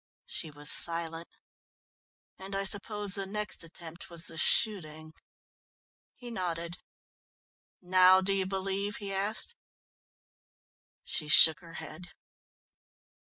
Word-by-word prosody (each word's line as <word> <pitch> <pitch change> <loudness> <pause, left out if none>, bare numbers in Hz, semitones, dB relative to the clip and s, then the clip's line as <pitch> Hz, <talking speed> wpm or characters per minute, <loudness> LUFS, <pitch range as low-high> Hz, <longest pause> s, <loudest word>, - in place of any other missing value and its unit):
She 180 - -3
was 145 0 -1
silent. 165 0 +3 1.1
"And 195 +1 -9
I 195 - -2
suppose 205 0 +1
the 195 0 -1
next 210 -2 -4
attempt 165 0 -11
was 170 -1 -7
the 165 - -8
shooting?" 155 -4 0 1.0
He 245 -2 -12
nodded. 175 -4 -6 1.1
"Now 185 +1 +4
do 195 +1 -1
you 190 -1 -2
believe?" 195 +1 -4
he 200 -1 -7
asked. 205 - +1 1.5
She 150 - -4
shook 150 +2 +7
her 165 -1 -16
head. 160 +3 -10
185 Hz, 110 wpm, -28 LUFS, 165-195 Hz, 1.5 s, shook